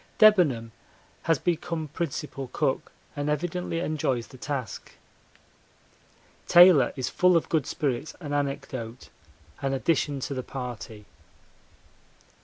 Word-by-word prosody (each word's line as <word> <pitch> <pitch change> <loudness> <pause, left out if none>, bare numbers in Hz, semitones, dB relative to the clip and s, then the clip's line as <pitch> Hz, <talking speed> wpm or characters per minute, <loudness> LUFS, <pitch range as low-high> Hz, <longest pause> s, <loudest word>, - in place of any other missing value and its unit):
Debenham 165 - +5 0.6
has 165 - +5
become 165 0 -2
principal 145 -3 -4
cook, 140 -4 -1 0.2
and 145 0 -2
evidently 175 +3 -2
enjoys 140 -8 -1
the 130 - -14
task. 130 -6 -5 1.5
Taylor 175 -7 +7
is 130 -2 -2
full 180 -1 +4
of 165 - -2
good 155 -5 +1
spirits 145 -3 -2
and 145 -4 -5
anecdote, 130 -4 -4 0.5
an 135 0 0
addition 145 0 0
to 140 - -3
the 130 - -3
party. 120 -5 -7
145 Hz, 110 wpm, -27 LUFS, 130-165 Hz, 1.5 s, Taylor